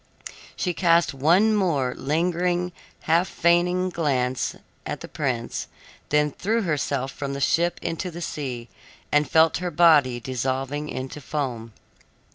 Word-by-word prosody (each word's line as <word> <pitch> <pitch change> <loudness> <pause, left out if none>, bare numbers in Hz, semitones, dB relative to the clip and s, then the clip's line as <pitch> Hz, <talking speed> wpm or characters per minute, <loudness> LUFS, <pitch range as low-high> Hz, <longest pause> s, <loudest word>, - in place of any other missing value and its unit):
She 180 - -1
cast 170 -4 +3
one 175 +11 +4
more 145 -11 +1
lingering, 175 +4 0 0.3
half 170 +3 +2
fainting 180 +2 +2
glance 130 -7 -1 0.3
at - - -5
the - - -7
prince, 125 -6 -3 0.4
then 150 0 +2
threw 220 +9 -1
herself 140 -5 -1
from 140 -1 -5
the - - -4
ship 170 +5 +1
into 170 +2 -3
the 170 0 -8
sea 130 -8 -5 0.4
and 150 -2 +2
felt 160 0 +4
her 180 0 -3
body 150 -7 +4
dissolving 135 +4 -3
into 130 +3 -6
foam. 125 -6 -4
150 Hz, 130 wpm, -24 LUFS, 135-175 Hz, 0.4 s, one